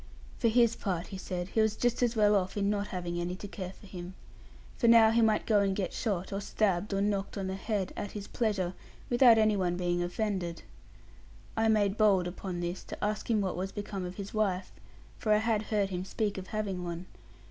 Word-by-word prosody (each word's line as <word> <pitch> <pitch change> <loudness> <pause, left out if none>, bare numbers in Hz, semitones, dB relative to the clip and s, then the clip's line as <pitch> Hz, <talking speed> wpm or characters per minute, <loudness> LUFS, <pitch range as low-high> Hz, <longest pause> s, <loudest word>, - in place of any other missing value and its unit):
For 235 - +3
his 235 0 +4
part, 180 -4 -2
he 195 - -6
said, 180 -1 -4
he 220 - +2
was 220 -1 +2
just 245 +1 0
as 240 -1 +2
well 210 -1 +4
off 190 0 0
in 200 0 +2
not 205 0 -1
having 175 -1 -3
any 175 +1 -2
to 205 - -8
care 190 -2 -6
for - - -15
him. 185 -1 -8 0.6
For 235 - +3
now 230 -1 +7
he 230 +1 +3
might 220 -1 +3
go 215 -2 +4
and 195 -1 +1
get 190 -3 -2
shot, 195 -4 -2
or 195 - -2
stabbed, 205 -1 0
or 195 0 0
knocked 200 0 -1
on 195 - -2
the 190 - -2
head, 195 -1 -2
at 205 - -5
his 205 -1 -6
pleasure, 200 -6 -1 0.4
without 240 -2 +7
any 215 -1 +4
one 180 -2 0
being 175 -1 0
offended. 175 -2 -2 0.9
I 225 0 +2
made 210 -1 +2
bold, 200 -4 +4
upon 180 0 -5
this, 175 +1 -3
to - - -7
ask 210 +2 -2
him 220 -3 +3
what 190 -2 -1
was 190 +2 -3
become 200 -2 -5
of 180 0 -5
his 200 0 -7
wife; 200 -4 0 0.5
for 215 - 0
I - - +5
had 220 -1 +1
heard 205 -3 +1
him 180 0 -2
speak 205 0 -2
of 185 - -9
having 205 -5 -3
one. 170 +1 -5
200 Hz, 225 wpm, -30 LUFS, 185-215 Hz, 0.9 s, now